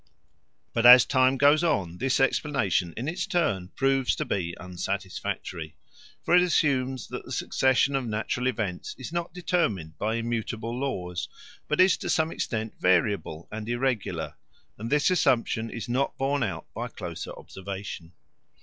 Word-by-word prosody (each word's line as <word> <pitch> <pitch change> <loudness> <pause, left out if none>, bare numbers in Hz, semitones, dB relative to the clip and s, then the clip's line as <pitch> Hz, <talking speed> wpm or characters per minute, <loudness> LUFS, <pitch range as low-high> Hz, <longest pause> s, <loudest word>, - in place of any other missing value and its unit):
But 115 - +1
as 125 0 +10
time 130 0 +3
goes 145 +4 +5
on 95 - 0
this 130 +1 +1
explanation 130 - +1
in 125 +5 -3
its 180 +4 -2
turn 155 - 0
proves 135 -1 +2
to - - -2
be 85 -3 -2
unsatisfactory. 90 -3 -4 0.5
For 175 - +3
it 180 - +7
assumes 135 -7 +1
that - - -6
the - - -11
succession 130 +1 +2
of 130 -3 -1
natural 110 +3 -1
events 105 -8 -3
is 130 +5 -8
not 170 0 -2
determined 110 - -1
by 110 +1 0
immutable 115 0 -3
laws, 90 -10 -3 0.4
but 150 - -1
is 185 -1 +6
to - - -5
some 160 0 +2
extent 110 -2 -3
variable 90 -3 +1
and 110 +1 -5
irregular, 120 -2 -1 0.4
and 115 +3 -6
this 150 +6 +3
assumption 120 -8 +2
is 115 -3 -6
not 130 +3 0
borne 140 +1 0
out 110 -6 -2
by - - -4
closer - - -7
observation. 95 -3 -7
120 Hz, 150 wpm, -27 LUFS, 100-140 Hz, 0.5 s, as